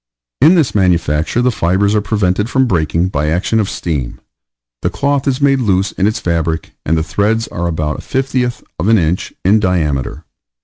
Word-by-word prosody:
In 160 +7 +6
this 160 -7 +2
manufacture 85 +1 +1
the 125 - +3
fibers 100 0 +1
are 105 - +2
prevented 105 0 0
from 130 +2 +2
breaking 85 -3 0
by 75 -4 -1
action 90 +7 0
of 100 -3 0
steam, 70 -8 -4 0.6
the - - 0
cloth 140 0 -1
is 130 -1 +1
made 140 -1 +3
loose 95 -4 +1
in 95 - 0
its 110 - -1
fabric, 80 -2 -2
and 80 +2 +1
the 80 - 0
threads 105 +8 0
are 85 0 -3
about 75 -2 -2
the - - -7
fiftieth 130 -3 -2 0.2
of 90 - -1
an 115 0 +5
inch 85 0 -1
in 105 +4 +4
diameter. 80 - -1
95 Hz, 185 wpm, -15 LUFS, 80-115 Hz, 0.6 s, In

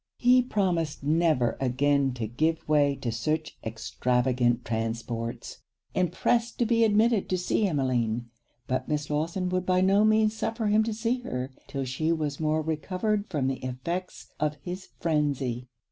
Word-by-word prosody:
He 250 +1 +5
promised 180 - -1
never 150 -6 +2
again 135 +1 +2
to 120 -3 -3
give 155 +9 -1
way 145 -2 +3
to 120 - 0
such 155 +8 -2
extravagant 120 +2 0
transports, 115 +1 -3 0.3
and 180 -3 +1
pressed 230 +5 +1
to 240 - +2
be 230 0 +3
admitted 220 0 +3
to 185 - +1
see 190 +4 +1
Emmeline; 120 - 0 0.3
but 130 - -2
Miss 150 0 -1
Lawson 165 +5 -1
would 185 0 0
by 185 0 +3
no 195 +2 +4
means 215 0 +3
suffer 225 0 -2
him 210 +1 +4
to 225 - -1
see 230 +3 0
her 130 - -4 0.2
'till 135 -1 -3
she 145 +6 -1
was 150 -4 -1
more 155 0 +1
recovered 190 +7 -1
from 150 -7 -1
the 130 -1 -2
effects 170 +9 -5
of 150 0 0
his 185 +1 -6
frenzy. 140 -6 0
155 Hz, 160 wpm, -27 LUFS, 130-190 Hz, 0.3 s, He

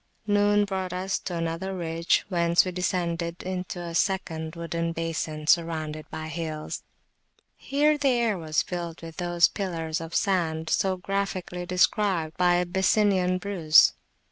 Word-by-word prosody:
Noon 205 0 +3
brought 190 -2 -3
us 190 +2 -1
to 180 - -5
another 165 +3 -3
ridge, 165 -1 0
whence 170 -2 +3
we 185 - -2
descended 170 -1 -2
into 180 -1 -4
a 170 -1 -6
second 165 -3 -1
wooded 170 0 -3
basin 160 -2 -3
surrounded 155 -2 0
by 155 0 -6
hills. 160 -1 -5 0.7
Here 295 +2 +1
the 280 -1 +3
air 235 -4 +2
was 155 -3 0
filled 170 -2 -5
with 165 -1 -9
those 175 -1 +3
pillars 165 -4 -3
of 165 +1 -7
sand 165 -5 0
so 190 -1 +1
graphically 185 -2 -3
described 180 -3 +1
by 180 -1 +3
Abyssinian 185 +1 +2
Bruce. 180 -5 +5
175 Hz, 140 wpm, -26 LUFS, 165-190 Hz, 0.7 s, Bruce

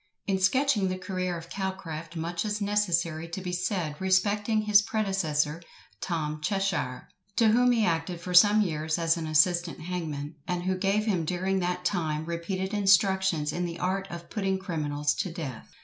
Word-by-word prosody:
In 195 -1 0
sketching 215 +1 +2
the 185 0 -2
career 185 -2 -3
of 165 0 -11
Calcraft, 175 -5 -5
much 170 +1 -2
is 210 -1 -2
necessary 175 -6 0
to 170 +3 -5
be 180 -1 -4
said 180 -3 -2
respecting 205 +3 +2
his 210 -1 +6
predecessor, 170 -8 -1 0.4
TOM 155 -3 -2
CHESHIRE, 195 -8 -1 0.3
to 225 -2 +4
whom 245 +3 +4
he 230 -3 +3
acted 170 0 -1
for 180 +1 -5
some 205 +4 +7
years 155 -4 -1
as 165 -1 +2
an 165 -2 -4
assistant 170 +2 +2
hangman, 155 -4 -5
and 180 -1 -2
who 185 +1 0
gave 195 +3 +1
him 190 -7 +1
during 185 +3 -1
that 180 0 -2
time 160 -5 -1
repeated 185 +3 -3
instructions 190 -5 +3
in 180 - -2
the 170 -1 -5
art 190 +2 -1
of 170 0 -8
putting 195 -3 -1
criminals 150 -6 -1
to 185 - -3
death. 155 -8 -7
180 Hz, 170 wpm, -28 LUFS, 165-195 Hz, 0.4 s, some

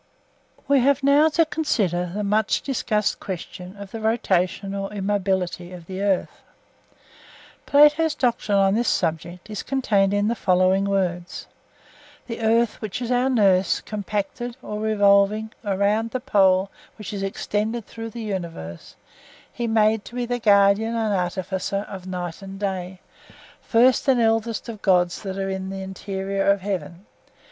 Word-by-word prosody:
We 280 -1 +4
have 275 +2 +2
now 285 +3 +5
to 330 +2 +3
consider 200 - 0
the 210 - -2
much 210 +2 +1
discussed 215 -6 -1
question 180 0 -7
of 200 -1 -9
the 225 - -6
rotation 195 -3 0
or 195 0 -4
immobility 190 -3 -1
of 175 -2 -10
the 190 +2 -6
earth. 200 -2 -1 1.3
Plato's 295 +2 +5
doctrine 235 -6 +1
on 195 0 +4
this 235 +3 0
subject 170 +2 -1
is 210 -2 -5
contained 210 -8 +1
in 205 +1 +1
the 230 - +1
following 185 -2 +2
words:—'The 190 +4 -6
earth, 225 +1 +2
which 215 -1 -4
is 245 -1 -3
our 250 +1 +2
nurse, 195 -7 +3
compacted 210 +4 -4
(OR 210 0 -5
revolving) 210 0 +3
around 205 +2 +1
the 255 - -3
pole 195 -6 +3 0.3
which 210 -1 -7
is 200 - -4
extended 210 +3 -2
through 225 0 -7
the 230 +1 -7
universe, 170 - -6 0.6
he 240 -1 -3
made 220 -1 +2
to 240 - -11
be 245 -1 -1
the 245 0 -2
guardian 205 +1 +4
and 220 -2 0
artificer 190 +2 -2
of 185 -1 -9
night 180 -1 -5
and 195 0 -9
day, 185 -2 -4 0.6
first 250 +3 +3
and 260 -2 +4
eldest 225 0 0
of 220 -3 -8
gods 180 -2 +2
that 195 -2 -5
are 195 0 -2
in 190 0 -4
the 195 0 -5
interior 195 +1 -3
of 200 -1 +3
heaven'. 180 -1 -5
200 Hz, 150 wpm, -23 LUFS, 190-225 Hz, 1.3 s, now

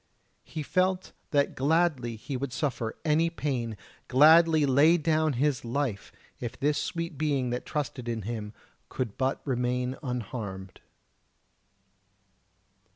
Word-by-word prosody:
He 155 -1 -6
felt 185 +4 0 0.2
that 145 -1 +2
gladly 140 -6 +1
would 135 -1 -2
he - - -6
suffer 125 -7 -2
any 160 +2 +3
pain, 125 -9 -3 0.3
gladly 155 +3 +6
lay 145 +6 +5
down 155 -1 +1
his 135 +1 0
life, 120 -4 -2 0.3
if 120 -2 -6
this 145 +2 +1
sweet 165 -4 -4
being 140 -5 0
that 125 - -4
trusted 125 -4 -3
in 115 -2 -3
him 105 -1 -4 0.4
could 115 -6 -3
but 130 +1 -1
remain 125 0 -1
unharmed. 110 -7 -5
135 Hz, 120 wpm, -28 LUFS, 120-155 Hz, 0.4 s, gladly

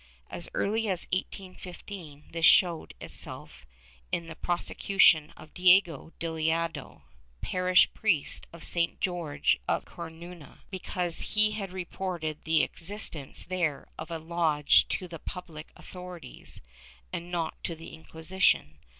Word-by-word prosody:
As - - -6
early 220 +2 +1
as 185 -3 +1
1815 185 -4 -6
this 165 0 -4
showed 170 -1 +5
itself 65 - -4 0.4
in 170 - -1
the 165 -1 -8
prose 175 +1 -2
cution 170 -6 +4
of 155 - -14
Diego 180 -4 +4
Dilicado, 165 0 -2 0.4
parish 180 0 +4
priest 175 -10 +2
of 170 - -10
San 170 -1 +1
Jorje 170 - 0
in - - +2
Coruiia, 170 -1 -10
because 180 -2 0
he 215 0 +7
had 200 -3 -4
reported 175 -4 -4
the 160 0 +4
existence 165 -6 -4
there 170 -6 -1
of 155 +2 -6
a 165 - -3
lodge 160 -2 +3
to 185 - -2
the 165 -2 -8
public 165 -4 -8
authorities 180 -2 -7 0.5
and 170 +1 -4
not 170 -2 -3
to 170 - -3
the 165 +1 -11
Inquisition. 160 - 0
170 Hz, 125 wpm, -29 LUFS, 160-185 Hz, 0.5 s, he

